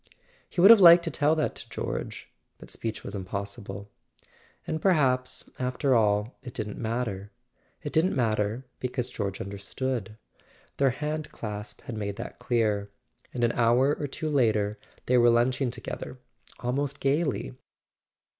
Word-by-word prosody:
He - - -6
would 195 +5 +10
have 230 - +9
liked 170 -1 +9
to 165 - -2
tell 150 +2 +2
that 155 - 0
to - - -10
George; - - -4 0.3
but - - -12
speech 110 -1 -4
was - - -6
impossible. 100 +1 -6 0.7
And 155 - -3
perhaps, 130 -8 +2
after 130 +2 +1
all, 105 0 +2
it 125 - -10
didn't 105 -2 -4
matter; 110 -4 -3 0.5
it 145 - -5
didn't 165 +4 +2
matter, 110 0 0
because 125 -1 -3
George 100 -5 -3
understood. 105 +3 -4 0.6
Their 140 -1 +4
hand 150 +3 -3
clasp 105 -1 -7
had 120 - -7
made 100 -2 -3
that 115 - -8
clear, 105 -4 0 0.4
and 120 - -2
an 120 - +4
hour 120 +5 +3
or 145 - -3
two 155 +3 -5
later 110 -6 +2 0.3
they 125 0 +4
were 120 0 +6
lunching 125 +2 +2
together 125 +1 -6 0.4
almost 140 +3 -2
gaily. 140 - 0
120 Hz, 145 wpm, -27 LUFS, 105-140 Hz, 0.7 s, would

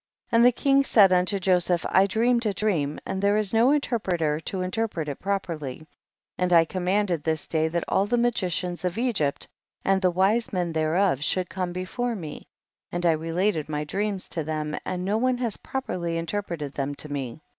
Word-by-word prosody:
49. - - +1
And 235 - +6
the - - +6
king 275 0 +4
said 200 -8 +5
unto 180 +2 +2
Joseph, 180 -2 +1
T 190 +1 +6
dreamed 235 +3 +2
a 205 - 0
dream, 160 -10 0
and 190 - -3
there 200 +1 +3
is 215 -1 -1
no 230 +3 +5
interpreter 185 - 0
to 185 +3 -4
interpret 185 -4 -2
it 145 - -5
properly, 165 -8 -3 0.5
and 180 0 +1
I 165 -1 +6
commanded 185 -1 0
this 160 -1 -1
day 160 -1 +1
that 170 +1 -1
all 195 +1 +1
the 240 +3 +1
magicians 185 -7 0
of 180 +1 -2
Egypt 220 - 0 0.4
and 195 0 +3
the 185 - +4
wise 195 +6 +1
men 175 -4 -1
thereof, 160 -1 +1
should 180 +3 0
come 185 -2 -2
before 205 +7 -3
me, 160 -7 -8 0.4
and 175 0 -2
I 170 - +6
related 165 +1 -1
my 150 0 -2
dreams 195 +4 -3
to 165 - -3
them, 150 0 -3
and 180 0 -3
no 210 +3 +1
one 255 +1 +1
has 235 -4 -2
properly 175 -11 -3
interpreted 165 -4 -4
them 140 0 -3
to 150 - -4
me. 140 +1 -5
185 Hz, 190 wpm, -25 LUFS, 160-205 Hz, 0.5 s, And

